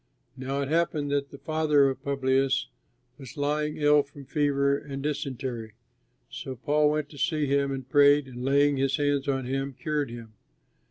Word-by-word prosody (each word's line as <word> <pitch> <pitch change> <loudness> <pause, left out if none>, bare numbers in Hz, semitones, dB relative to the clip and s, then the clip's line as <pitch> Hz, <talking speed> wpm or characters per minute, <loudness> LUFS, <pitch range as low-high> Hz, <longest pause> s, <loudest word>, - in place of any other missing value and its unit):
Now 135 +2 -3
it 140 - -2
happened 155 -2 0
that 140 -1 0
the 140 - -11
father 150 -2 +2
of 135 -1 -3
Publius 135 -1 +1 0.5
was 135 -1 -11
lying 150 +1 -1
ill 150 0 +5
from 140 0 -13
fever 140 0 +1
and 140 -1 -6
dysentery. 130 -6 -4 0.6
So 130 - -6
Paul 150 +4 +2
went 150 -1 -1
to 145 - -12
see 155 0 +1
him 140 0 +1
and 135 -2 -5
prayed, 145 0 +5
and, 125 -1 -8
laying 140 +1 +3
his 135 0 +1
hands 145 -1 0
on 135 -2 -1
him, 135 +1 -3
cured 150 -3 -1
him. 115 -2 -10
140 Hz, 170 wpm, -27 LUFS, 135-145 Hz, 0.6 s, ill